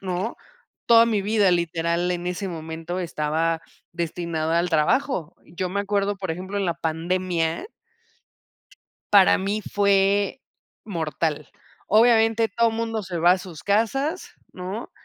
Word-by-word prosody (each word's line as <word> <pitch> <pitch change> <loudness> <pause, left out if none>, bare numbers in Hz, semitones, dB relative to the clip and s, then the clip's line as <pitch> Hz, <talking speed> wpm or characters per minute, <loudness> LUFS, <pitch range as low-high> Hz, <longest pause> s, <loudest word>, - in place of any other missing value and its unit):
¿no? 190 +4 -3 0.5
Toda 230 -1 +7
mi 220 -3 +1
vida, 205 -1 +2
literal, 170 0 0
en 175 0 -3
ese 185 +2 -3
momento, 165 +1 -5
estaba 165 -1 -1 0.3
destinada 170 -1 -2
al 175 - -2
trabajo. 165 - +1
Yo 180 +3 -4
me 200 +3 -1
acuerdo, 200 0 0
por 190 -3 -4
ejemplo, 185 +4 -5
en 195 - 0
la 170 - 0
pandemia 170 - -2 1.4
para 200 -2 +6
mí 200 +3 -2
fue, 200 +3 +2 0.4
mortal. 160 -5 -2 0.4
Obviamente, 225 0 +4
todo 230 +2 +2
mundo 225 -1 -3
se 180 -3 -5
va 175 +2 +6
a 185 - +1
sus 175 -4 -10
casas, 270 - 0 0.2
¿no? 185 +5 -6
185 Hz, 130 wpm, -24 LUFS, 170-205 Hz, 1.4 s, Toda